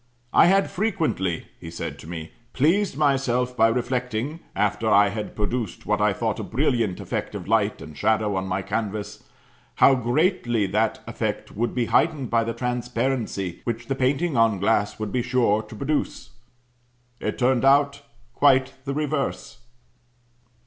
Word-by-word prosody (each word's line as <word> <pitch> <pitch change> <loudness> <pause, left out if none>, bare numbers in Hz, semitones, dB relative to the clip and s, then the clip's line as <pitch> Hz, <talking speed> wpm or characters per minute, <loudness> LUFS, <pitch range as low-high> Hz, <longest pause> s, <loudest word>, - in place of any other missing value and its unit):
'I - - +7
had 195 +2 +3
frequently,' 160 - -1
he 85 - -8
said 85 - -6
to - - -11
me, 80 -2 -7 0.2
'pleased 170 +4 +2
myself 130 -4 +1
by 115 -1 +5
reflecting, 125 +4 -2 0.2
after 105 +2 0
I 100 -1 +5
had 105 +1 -5
produced 110 0 -3
what - - 0
I - - +4
thought - - -2
a - - -3
brilliant 115 -6 0
effect - - -4
of - - -6
light - - +1
and 75 0 -11
shadow 105 +3 +1
on 95 0 -2
my 95 +1 -2
canvas, 105 0 -4 0.5
how 135 - +6
greatly 125 - +1
that 105 +3 0
effect - - -4
would 115 +3 -1
be 125 -2 +1
heightened 150 -1 +1
by 115 -1 +3
the 115 0 -3
transparency 125 -6 -2
which 120 0 -3
the 135 - -2
painting 135 +5 0
on 115 -3 +3
glass 100 +1 +1
would 110 -2 -4
be 125 - 0
sure 120 -4 +2
to 110 - -12
produce. 145 +5 -2 0.9
It - - -3
turned 125 0 +2
out 140 +1 +4 0.3
quite 130 -1 +3
the 140 0 -3
reverse.'" 150 -2 -2
120 Hz, 155 wpm, -24 LUFS, 105-135 Hz, 0.9 s, I